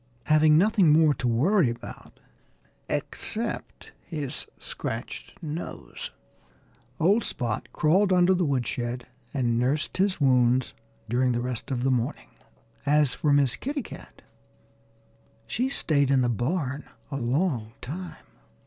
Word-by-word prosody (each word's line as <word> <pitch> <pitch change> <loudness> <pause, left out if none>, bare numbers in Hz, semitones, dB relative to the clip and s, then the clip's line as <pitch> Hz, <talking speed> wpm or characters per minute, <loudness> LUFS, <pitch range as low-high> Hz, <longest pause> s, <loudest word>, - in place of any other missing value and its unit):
Having 155 0 +5
nothing 195 -1 +4
more 155 -1 +5
to 125 -1 -2
worry 145 - +3
about 115 - -9 0.7
except - - -3
his 145 -3 -5
scratched 60 0 -6
nose, 150 - -6 0.9
old 200 +8 +4
Spot 115 -4 -3
crawled 190 +6 +3
under 180 0 +5
the 180 -1 +1
woodshed 125 -3 -1 0.3
and 120 -4 +1
nursed 135 +5 0
his 190 -1 +1
wounds 125 -2 +3 0.3
during 125 +2 +2
the 120 - 0
rest 125 -1 -4
of 125 -2 -1
the 135 - +2
morning. 120 -2 -2 0.5
As 145 -1 +3
for 150 - +1
Miss 140 -2 +3
Kitty 280 - -3
Cat, - - -12 1.2
she 255 +2 -1
stayed 145 - +1
in 135 -1 +4
the 120 - +2
barn 135 - -2 0.2
a 140 - -2
long 125 -3 0
time. 175 +7 -7
140 Hz, 125 wpm, -26 LUFS, 125-165 Hz, 1.2 s, Having